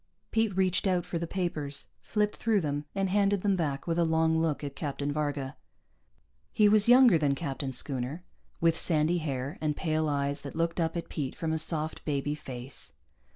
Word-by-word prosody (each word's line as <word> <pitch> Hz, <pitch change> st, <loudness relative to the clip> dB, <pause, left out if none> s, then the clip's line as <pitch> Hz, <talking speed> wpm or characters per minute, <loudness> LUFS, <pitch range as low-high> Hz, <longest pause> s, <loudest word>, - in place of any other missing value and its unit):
Pete 220 Hz, -4 st, +1 dB
reached 185 Hz, 0 st, +2 dB
out 180 Hz, -2 st, +1 dB
for 170 Hz, -, -3 dB
the 170 Hz, -, -3 dB
papers, 160 Hz, -6 st, -3 dB
flipped 210 Hz, -1 st, 0 dB
through 220 Hz, -2 st, +2 dB
them, 145 Hz, -3 st, -2 dB
and 195 Hz, -1 st, +1 dB
handed 200 Hz, 0 st, +2 dB
them 200 Hz, -2 st, +3 dB
back 145 Hz, -6 st, -2 dB
with 170 Hz, 0 st, 0 dB
a -, -, +4 dB
long 160 Hz, 0 st, +2 dB
look 155 Hz, -3 st, -1 dB
at 140 Hz, -1 st, -5 dB
Captain 145 Hz, -1 st, -3 dB
Varga. 145 Hz, -2 st, -2 dB, 1.0 s
He 210 Hz, -, +4 dB
was 210 Hz, +1 st, +4 dB
younger 245 Hz, -8 st, +7 dB
than 140 Hz, -2 st, +2 dB
Captain 140 Hz, -3 st, -4 dB
Schooner, 130 Hz, +5 st, -2 dB, 0.4 s
with 165 Hz, -1 st, +3 dB
sandy 160 Hz, +1 st, +2 dB
hair 140 Hz, -2 st, -4 dB
and 150 Hz, -2 st, -1 dB
pale 155 Hz, -2 st, 0 dB
eyes 140 Hz, 0 st, -1 dB
that 140 Hz, -, -8 dB
looked 165 Hz, +1 st, -1 dB
up 165 Hz, 0 st, 0 dB
at 170 Hz, -, -4 dB
Pete 140 Hz, -5 st, -4 dB
from 160 Hz, -1 st, -2 dB
a 160 Hz, -, 0 dB
soft 155 Hz, 0 st, +1 dB
baby 145 Hz, -1 st, -1 dB
face. 130 Hz, -3 st, -8 dB
160 Hz, 190 wpm, -29 LUFS, 145-180 Hz, 1.0 s, younger